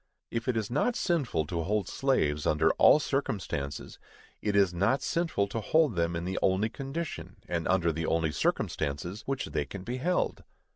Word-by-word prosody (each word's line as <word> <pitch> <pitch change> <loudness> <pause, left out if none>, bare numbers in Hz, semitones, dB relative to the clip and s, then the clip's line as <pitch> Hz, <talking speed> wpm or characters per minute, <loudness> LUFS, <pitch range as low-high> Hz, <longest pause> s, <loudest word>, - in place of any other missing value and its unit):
If 115 -1 -3
it 125 -3 +1
is 110 0 -2
not 225 - +1
sinful 145 - 0
to 85 +2 -2
hold 100 +2 0
slaves, 75 - +1
under 80 +1 +3
all - - +7
circumstances, 95 - -3 0.4
it 105 -1 0
is 100 -3 +4
not 115 +10 +1
sinful 165 -13 0
to 115 +2 -3
hold 155 - +3
them 85 0 0
in 85 +1 -3
the 95 +1 -2
only 95 +4 +2
condition, 140 +7 -5
and 85 -2 -2
under 85 -3 +2
the 80 +1 -3
only 80 -1 +1
circumstances, 80 +8 -1
which 135 -1 -1
they 75 - -2
can 100 +3 -8
be 120 +5 -4
held. 180 +7 0
100 Hz, 180 wpm, -29 LUFS, 85-135 Hz, 0.4 s, all